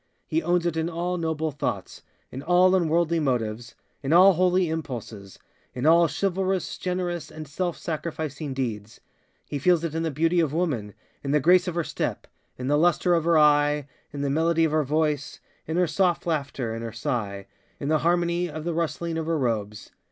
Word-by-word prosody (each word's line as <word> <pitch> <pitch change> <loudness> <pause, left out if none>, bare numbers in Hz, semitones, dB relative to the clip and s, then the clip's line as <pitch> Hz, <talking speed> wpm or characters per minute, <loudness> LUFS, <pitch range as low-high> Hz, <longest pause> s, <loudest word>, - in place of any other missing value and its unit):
He 325 - 0
owns 175 - +1
it 170 -2 0
in 160 +1 0
all 175 +2 -2
noble 160 -1 -1
thoughtsŌĆöin 135 -1 -6
all 180 +1 +5
unworldly 170 -2 +2
motivesŌĆöin 120 0 -3
all 190 +2 +8
holy 180 +1 +2
impulsesŌĆöin 125 - -6
all 170 +1 +6
chivalrous, 190 +4 -1
generous, 180 -2 -3
and 155 -1 -9
self 175 +4 -3
sacrificing 155 -3 -4
deeds. 115 -4 -4 0.5
He 145 - -4
feels 170 +3 +3
it 165 -2 -3
in 165 - -1
the 165 - 0
beauty 165 +4 +1
of 155 -4 +1
womanŌĆöin 135 - -1 0.3
the 145 +2 +2
grace 180 +5 +4
of 175 - -3
her 170 - 0
stepŌĆöin - - -3 0.4
the 145 +1 +3
lustre 175 +1 +3
of 165 -2 +1
her 170 -1 +3
eyeŌĆöin 150 -1 +4 0.3
the 140 -1 -2
melody 165 +2 +2
of 160 - 0
her 155 0 +2
voiceŌĆöin 150 0 -1 0.4
her 180 +1 +3
soft 175 +1 +1
laughter, 140 -7 -2
in 115 - -5
her 115 - -4
sighŌĆöin 110 -6 -3 0.4
the 155 +2 +1
harmony 175 +1 +1
of 155 0 -6
the 170 0 -2
rustling 165 0 -2
of 160 - -4
her 165 -1 +1
robes. 110 -6 -2
160 Hz, 170 wpm, -25 LUFS, 140-175 Hz, 0.5 s, all